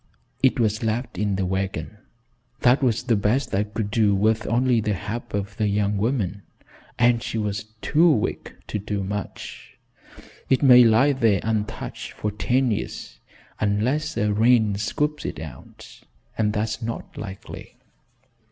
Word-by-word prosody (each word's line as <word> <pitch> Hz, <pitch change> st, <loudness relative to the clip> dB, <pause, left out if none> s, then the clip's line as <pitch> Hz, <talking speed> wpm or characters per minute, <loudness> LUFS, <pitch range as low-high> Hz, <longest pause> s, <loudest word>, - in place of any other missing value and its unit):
It 130 Hz, -1 st, +3 dB
was 110 Hz, -2 st, +1 dB
left 115 Hz, -3 st, -2 dB
in 105 Hz, -1 st, 0 dB
the 95 Hz, 0 st, -1 dB
wagon. 95 Hz, +3 st, -3 dB, 0.6 s
That 125 Hz, +3 st, +4 dB
was 120 Hz, -4 st, +1 dB
the 115 Hz, -, +2 dB
best 105 Hz, +7 st, 0 dB
I 95 Hz, -, +2 dB
could 105 Hz, 0 st, -3 dB
do 105 Hz, -3 st, +3 dB
with 110 Hz, +3 st, +1 dB
only 120 Hz, +1 st, +2 dB
the 105 Hz, -1 st, 0 dB
help 105 Hz, +3 st, -5 dB
of 100 Hz, +1 st, -3 dB
the 110 Hz, -, +1 dB
young 105 Hz, 0 st, +1 dB
woman, 105 Hz, -3 st, -1 dB, 0.6 s
and 120 Hz, -1 st, +3 dB
she 115 Hz, -, -4 dB
was 105 Hz, -1 st, -2 dB, 0.2 s
too 170 Hz, +3 st, +4 dB
weak 115 Hz, -9 st, -1 dB
to 105 Hz, -, -2 dB
do 100 Hz, -1 st, -3 dB
much. 105 Hz, +1 st, -6 dB, 0.7 s
It 130 Hz, -, +3 dB
may 125 Hz, -2 st, +9 dB
lie 120 Hz, +5 st, +5 dB
there 115 Hz, -7 st, +2 dB
untouched 110 Hz, -2 st, -3 dB
for 105 Hz, -, -3 dB
ten 125 Hz, +4 st, +1 dB
years -, -, -5 dB, 0.4 s
unless 125 Hz, +10 st, 0 dB
a 105 Hz, 0 st, +1 dB
rain 110 Hz, -1 st, +4 dB
scoops 150 Hz, +8 st, -1 dB
it -, -, -5 dB
out, 70 Hz, -5 st, -11 dB, 0.3 s
and 105 Hz, -1 st, +1 dB
that's 105 Hz, +1 st, -2 dB
not 115 Hz, 0 st, -5 dB
likely. 100 Hz, -2 st, -9 dB
110 Hz, 150 wpm, -24 LUFS, 105-120 Hz, 0.7 s, may